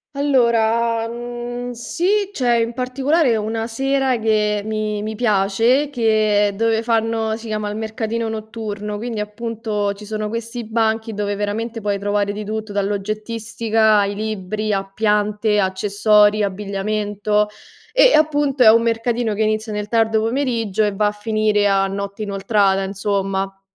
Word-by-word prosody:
Allora, 235 Hz, -4 st, +2 dB
mhmm, 240 Hz, +1 st, -5 dB
sì, 375 Hz, -, 0 dB
c'è 245 Hz, -8 st, +1 dB
in 230 Hz, 0 st, 0 dB
particolare 260 Hz, +2 st, +1 dB
una 225 Hz, +1 st, -2 dB
sera 270 Hz, +2 st, 0 dB
che 210 Hz, -2 st, +1 dB
mi 215 Hz, -1 st, -2 dB
mi 215 Hz, +1 st, -3 dB
piace, 225 Hz, +5 st, +2 dB
che 215 Hz, -4 st, +2 dB
dove 225 Hz, +1 st, +1 dB
fanno 225 Hz, -1 st, 0 dB
si 230 Hz, 0 st, -10 dB
chiama 215 Hz, -1 st, -2 dB
il 210 Hz, -, -5 dB
mercatino 220 Hz, +1 st, -3 dB
notturno, 215 Hz, -1 st, -5 dB
quindi, 230 Hz, -1 st, -4 dB
appunto, 210 Hz, -1 st, -3 dB
ci 210 Hz, +1 st, -12 dB
sono 215 Hz, 0 st, -3 dB
questi 230 Hz, +2 st, -5 dB
banchi 220 Hz, 0 st, 0 dB
dove 205 Hz, 0 st, -2 dB
veramente 220 Hz, +3 st, -3 dB
puoi 200 Hz, -1 st, -1 dB
trovare 205 Hz, 0 st, 0 dB
di 210 Hz, +1 st, -5 dB
tutto, 215 Hz, 0 st, -4 dB
dall'oggettistica, 215 Hz, +2 st, 0 dB
ai 200 Hz, 0 st, 0 dB
libri, 215 Hz, 0 st, -3 dB
a 195 Hz, 0 st, -2 dB
piante, 210 Hz, 0 st, +1 dB
accessori, 205 Hz, +2 st, +3 dB
abbigliamento 205 Hz, +1 st, -1 dB, 0.4 s
e, -, -, +6 dB
appunto, 290 Hz, -3 st, +2 dB
è 220 Hz, -, +9 dB
un 230 Hz, +1 st, +4 dB
mercatino 230 Hz, -1 st, 0 dB
che 220 Hz, -, +1 dB
inizia 215 Hz, 0 st, -1 dB
nel 210 Hz, 0 st, -3 dB
tardo 220 Hz, -1 st, +2 dB
pomeriggio 230 Hz, -4 st, 0 dB
e 205 Hz, -1 st, 0 dB
va 210 Hz, +1 st, +2 dB
a -, -, +1 dB
finire 210 Hz, -1 st, +1 dB
a 195 Hz, -1 st, +3 dB
notte 200 Hz, +2 st, -5 dB
inoltrata, 195 Hz, -1 st, +1 dB
insomma. 195 Hz, 0 st, -2 dB
215 Hz, 145 wpm, -20 LUFS, 205-230 Hz, 0.4 s, è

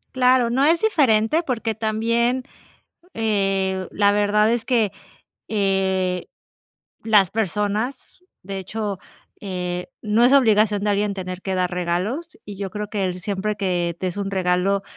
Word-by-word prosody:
Claro, 255 Hz, -1 st, +4 dB
no 265 Hz, +4 st, +2 dB
es 330 Hz, +2 st, +3 dB
diferente 295 Hz, -, +3 dB
porque 230 Hz, -6 st, -2 dB
también, 230 Hz, +3 st, 0 dB, 0.7 s
eh, 195 Hz, -3 st, 0 dB
la 205 Hz, 0 st, +3 dB
verdad 210 Hz, +1 st, +3 dB
es 235 Hz, -1 st, -1 dB
que, 225 Hz, -6 st, +2 dB, 0.6 s
eh, 190 Hz, -3 st, 0 dB, 0.8 s
las 210 Hz, -5 st, +4 dB
personas, 215 Hz, +4 st, -2 dB, 0.2 s
de 195 Hz, +1 st, -5 dB
hecho, 200 Hz, +1 st, -4 dB, 0.4 s
eh, 180 Hz, -2 st, -4 dB
no 215 Hz, +2 st, +2 dB
es 250 Hz, -, +5 dB
obligación 215 Hz, -5 st, +4 dB
de 210 Hz, -, +2 dB
alguien 205 Hz, 0 st, 0 dB
tener 185 Hz, -1 st, -6 dB
que 190 Hz, -, -2 dB
dar 180 Hz, -1 st, 0 dB
regalos, 180 Hz, -, -2 dB
y 205 Hz, -1 st, -8 dB
yo 195 Hz, 0 st, -4 dB
creo 210 Hz, +1 st, -5 dB
que 200 Hz, -3 st, -1 dB
siempre 205 Hz, +2 st, -2 dB
que 175 Hz, -4 st, -1 dB
t 185 Hz, -, -3 dB
es 180 Hz, -, -3 dB
un 195 Hz, -1 st, -2 dB
regalo, 190 Hz, +1 st, +1 dB
205 Hz, 145 wpm, -22 LUFS, 190-225 Hz, 0.8 s, es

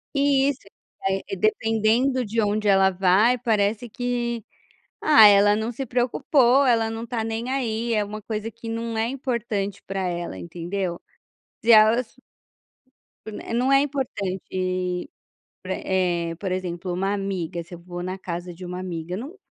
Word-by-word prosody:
E 280 Hz, -1 st, +3 dB
isso, 275 Hz, -, -3 dB, 0.5 s
eh, 195 Hz, 0 st, -2 dB
dependendo 225 Hz, +5 st, +2 dB
de 225 Hz, +2 st, 0 dB
onde 210 Hz, 0 st, 0 dB
ela 195 Hz, -1 st, +5 dB
vai, 195 Hz, +7 st, +3 dB
parece 225 Hz, 0 st, 0 dB
que: 240 Hz, -1 st, -2 dB, 0.6 s
"Ah, 290 Hz, -9 st, +8 dB
ela 205 Hz, 0 st, +6 dB
não 220 Hz, +2 st, -2 dB
se 265 Hz, +3 st, -4 dB
preocupou, 250 Hz, +2 st, +3 dB
ela 225 Hz, -2 st, +3 dB
não 225 Hz, 0 st, -5 dB
está 230 Hz, -2 st, -3 dB
nem 225 Hz, +2 st, -3 dB
aí", 235 Hz, -3 st, -1 dB
é 210 Hz, -, +1 dB
uma 210 Hz, +1 st, -7 dB
coisa 215 Hz, +1 st, -4 dB
que 230 Hz, 0 st, -10 dB
não 230 Hz, 0 st, -3 dB
é 220 Hz, +1 st, 0 dB
importante 235 Hz, -7 st, -3 dB
para 195 Hz, 0 st, -3 dB
ela, 175 Hz, -, -3 dB
entendeu? 175 Hz, -, -4 dB, 0.6 s
Se 235 Hz, -, +5 dB
elas 220 Hz, +2 st, +5 dB, 1.4 s
Não 255 Hz, +3 st, +2 dB
é 275 Hz, -, +6 dB
importante 185 Hz, -9 st, -3 dB, 0.5 s
para 190 Hz, 0 st, -3 dB
eh, 175 Hz, -3 st, -1 dB
por 190 Hz, +2 st, -4 dB
exemplo, 180 Hz, -1 st, -3 dB
uma 195 Hz, +3 st, -1 dB
amiga, 185 Hz, -4 st, -3 dB
se 175 Hz, +2 st, -12 dB
eu -, -, -9 dB
vou 175 Hz, 0 st, -7 dB
na 185 Hz, +1 st, -4 dB
casa 175 Hz, -1 st, -5 dB
de 180 Hz, +2 st, -10 dB
uma 180 Hz, 0 st, -5 dB
amiga, 175 Hz, -1 st, -5 dB
não 280 Hz, -, -7 dB
210 Hz, 155 wpm, -24 LUFS, 185-235 Hz, 1.4 s, Ah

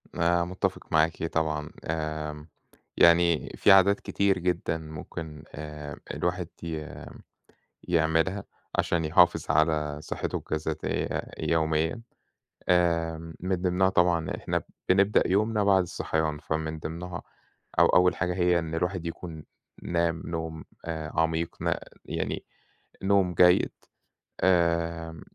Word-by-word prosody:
أنا 85 Hz, 0 st, +2 dB
متفق 95 Hz, +1 st, -3 dB
معاكِ 80 Hz, +1 st, +2 dB
طبعًا. 75 Hz, -2 st, -1 dB, 0.2 s
آمم، 75 Hz, -1 st, -4 dB, 0.5 s
يعني 85 Hz, -1 st, +5 dB
في -, -, +5 dB
عادات 95 Hz, +1 st, +6 dB
كتير 100 Hz, -1 st, +1 dB
جدًا 90 Hz, -2 st, 0 dB
ممكن 80 Hz, 0 st, -8 dB
آآ، 75 Hz, -1 st, -7 dB
الواحد 90 Hz, -1 st, -1 dB, 0.2 s
ي 80 Hz, -2 st, -4 dB, 1.0 s
يعملها 80 Hz, +3 st, +2 dB, 0.3 s
عشان 85 Hz, -1 st, +1 dB
يحافظ 85 Hz, 0 st, +4 dB
على 75 Hz, -1 st, +2 dB
صحته -, -, -3 dB
الجسدية 80 Hz, 0 st, -2 dB, 0.2 s
يوميًا، 80 Hz, +5 st, 0 dB, 0.7 s
آمم 85 Hz, -2 st, +1 dB
من 95 Hz, +1 st, 0 dB
ضِمنها 90 Hz, +1 st, +2 dB
طبعًا 85 Hz, -3 st, +2 dB
إحنا -, -, -2 dB, 0.3 s
بنبدأ 100 Hz, +3 st, +4 dB
يومنا 105 Hz, +2 st, +2 dB
بعد 95 Hz, -2 st, +5 dB
الصحيان، 80 Hz, -3 st, -2 dB
فمن 80 Hz, +1 st, -3 dB
ضِمنها 85 Hz, +3 st, -6 dB, 0.6 s
أو -, -, +7 dB
أول 90 Hz, 0 st, +4 dB
حاجة 90 Hz, -1 st, -1 dB
هي 90 Hz, -1 st, +3 dB
إن 80 Hz, -1 st, -4 dB
الواحد 90 Hz, +1 st, -1 dB
يكون 85 Hz, -2 st, -7 dB, 0.4 s
نام 85 Hz, -1 st, 0 dB
نوم 80 Hz, -1 st, -4 dB, 0.2 s
آآ 80 Hz, -2 st, -4 dB
عميق، 80 Hz, 0 st, 0 dB
نا -, -, 0 dB, 0.2 s
يعني -, -, -3 dB, 0.6 s
نوم 95 Hz, -2 st, +3 dB
جيد. 90 Hz, +1 st, +5 dB, 0.7 s
آآ، 85 Hz, -2 st, +1 dB
85 Hz, 115 wpm, -27 LUFS, 80-90 Hz, 1.0 s, أو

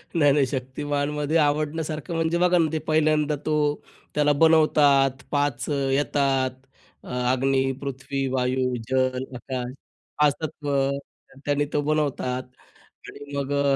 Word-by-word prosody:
नाही, 145 Hz, -3 st, +5 dB
नाही. 140 Hz, -1 st, +3 dB
शक्तिमानमध्ये 145 Hz, +3 st, -2 dB
आवडण्यासारखं 155 Hz, +2 st, -1 dB
म्हणजे 165 Hz, +1 st, +1 dB
बघा 180 Hz, 0 st, +3 dB
ना, 160 Hz, -2 st, +2 dB
ते 160 Hz, -, -1 dB
पहिल्यांदा 155 Hz, -1 st, +2 dB
तो 155 Hz, -1 st, +1 dB, 0.6 s
त्याला 150 Hz, 0 st, +3 dB
बनवतात. 145 Hz, -4 st, +4 dB
5 145 Hz, -3 st, 0 dB
येतात. 135 Hz, -1 st, +1 dB, 0.5 s
अ, -, -, -14 dB, 0.2 s
अग्नी, 135 Hz, +1 st, +1 dB
पृथ्वी, 135 Hz, 0 st, -3 dB
वायू, 125 Hz, 0 st, 0 dB
जल, 130 Hz, 0 st, +1 dB
आकाश. 125 Hz, 0 st, -5 dB, 0.5 s
5 150 Hz, -1 st, +5 dB
तत्व, 145 Hz, -2 st, -4 dB, 0.7 s
त्याने 145 Hz, 0 st, +1 dB
तो 145 Hz, -, +2 dB
बनवतात 140 Hz, -4 st, -1 dB, 0.6 s
आणि 145 Hz, 0 st, -10 dB
मग 140 Hz, 0 st, -2 dB
अ, 140 Hz, -1 st, +2 dB
145 Hz, 120 wpm, -24 LUFS, 135-150 Hz, 0.7 s, नाही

